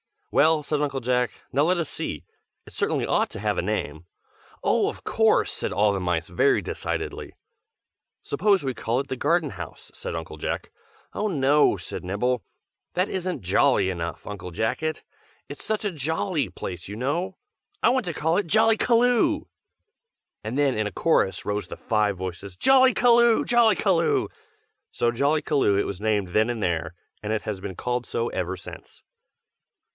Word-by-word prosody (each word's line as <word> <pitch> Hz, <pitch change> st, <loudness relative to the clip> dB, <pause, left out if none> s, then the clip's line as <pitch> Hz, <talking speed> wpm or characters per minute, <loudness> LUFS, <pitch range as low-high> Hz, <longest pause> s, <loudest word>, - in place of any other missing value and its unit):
"Well," 155 Hz, 0 st, +4 dB
said 150 Hz, 0 st, -1 dB
Uncle 140 Hz, -2 st, -1 dB
Jack, 125 Hz, 0 st, +1 dB, 0.2 s
"now 140 Hz, +3 st, +2 dB
let 180 Hz, +3 st, +2 dB
us 170 Hz, -3 st, -2 dB
see. -, -, -4 dB, 0.4 s
It -, -, -13 dB
certainly -, -, 0 dB
ought -, -, +1 dB
to -, -, -7 dB
have -, -, -1 dB
a -, -, +2 dB
name." 80 Hz, +3 st, -3 dB, 0.6 s
"Oh! -, -, +2 dB
of -, -, -9 dB
course!" -, -, +2 dB
said -, -, -3 dB
all 105 Hz, 0 st, +3 dB
the 100 Hz, -, -1 dB
mice 90 Hz, -3 st, -1 dB
very 90 Hz, -, +3 dB
decidedly. -, -, -4 dB, 0.9 s
"Suppose 195 Hz, +5 st, +2 dB
we 130 Hz, -1 st, -1 dB
call 120 Hz, +1 st, -1 dB
it 140 Hz, -, -11 dB
the 130 Hz, -, -3 dB
Garden 155 Hz, +1 st, +1 dB
House," 90 Hz, -5 st, -9 dB
said -, -, -6 dB
Uncle 80 Hz, -1 st, -6 dB
Jack. -, -, -4 dB, 0.4 s
"Oh, 215 Hz, -, -1 dB
no!" 145 Hz, -4 st, +3 dB
said -, -, -6 dB
Nibble. 120 Hz, +6 st, 0 dB, 0.5 s
"That 185 Hz, +2 st, 0 dB
isn't 185 Hz, -1 st, -3 dB
jolly 95 Hz, +2 st, +3 dB
enough, 85 Hz, -1 st, -5 dB
Uncle 100 Hz, -3 st, -6 dB
Jacket! 145 Hz, -, -2 dB, 0.5 s
it's 145 Hz, -, -8 dB
such 215 Hz, -1 st, -1 dB
a 205 Hz, -, 0 dB
jolly 160 Hz, -, -1 dB
place, 90 Hz, -1 st, -7 dB
you 100 Hz, -, -6 dB
know. 170 Hz, -, -2 dB, 0.5 s
I -, -, +6 dB
want 255 Hz, -2 st, +1 dB
to 175 Hz, -, -3 dB
call 160 Hz, +3 st, +1 dB
it 205 Hz, -, 0 dB
Jollykaloo!" 235 Hz, -, +3 dB, 1.0 s
And 110 Hz, +5 st, -4 dB
then 140 Hz, -3 st, +2 dB
in 110 Hz, -1 st, 0 dB
a -, -, -5 dB
chorus 95 Hz, -, +1 dB
rose 105 Hz, -2 st, -2 dB
the -, -, -8 dB
five 105 Hz, -3 st, 0 dB
voices, 95 Hz, 0 st, -6 dB
"Jollykaloo! 245 Hz, -, +5 dB
Jollykaloo!" 215 Hz, -7 st, +3 dB, 0.6 s
so 120 Hz, -, +1 dB
Jollykaloo 140 Hz, -4 st, +2 dB
it -, -, +1 dB
was 100 Hz, 0 st, -5 dB
named 105 Hz, -3 st, 0 dB
then 110 Hz, +5 st, +2 dB
and 115 Hz, -3 st, -2 dB
there, 85 Hz, -3 st, -1 dB, 0.3 s
and 105 Hz, +1 st, -2 dB
it 110 Hz, -, -1 dB
has 105 Hz, -3 st, -4 dB
been 95 Hz, -1 st, -6 dB
called 125 Hz, +3 st, -2 dB
so 115 Hz, +1 st, -1 dB
ever 90 Hz, 0 st, -3 dB
since. 90 Hz, -, -12 dB
130 Hz, 170 wpm, -25 LUFS, -, 1.0 s, I